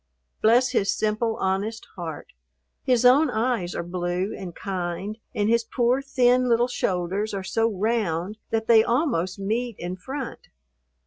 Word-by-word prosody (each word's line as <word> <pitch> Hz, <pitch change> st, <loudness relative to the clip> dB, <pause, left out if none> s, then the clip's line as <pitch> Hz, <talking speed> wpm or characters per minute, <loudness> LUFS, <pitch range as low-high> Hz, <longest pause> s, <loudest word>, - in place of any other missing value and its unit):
Bless 240 Hz, +4 st, +5 dB
his 200 Hz, -6 st, +1 dB
simple, 215 Hz, +1 st, 0 dB
honest 200 Hz, +3 st, -2 dB
heart! 165 Hz, -5 st, -7 dB, 0.5 s
His 250 Hz, -1 st, +2 dB
own 275 Hz, +5 st, +6 dB
eyes 220 Hz, -6 st, -1 dB
are -, -, -2 dB
blue 175 Hz, +2 st, -2 dB
and 175 Hz, -3 st, -8 dB
kind, 190 Hz, +3 st, -4 dB, 0.2 s
and 205 Hz, 0 st, +1 dB
his 230 Hz, +1 st, +3 dB
poor, 245 Hz, +3 st, +1 dB
thin 255 Hz, -2 st, +3 dB
little 235 Hz, +1 st, +3 dB
shoulders 195 Hz, -1 st, -1 dB
are 195 Hz, -, -3 dB
so 225 Hz, +4 st, +1 dB
round 205 Hz, -2 st, -1 dB
that 220 Hz, 0 st, -1 dB
they 225 Hz, -1 st, +6 dB
almost 235 Hz, -, 0 dB
meet 225 Hz, +4 st, -2 dB
in 175 Hz, +1 st, -4 dB
front. 265 Hz, +7 st, -7 dB
220 Hz, 145 wpm, -25 LUFS, 185-240 Hz, 0.5 s, own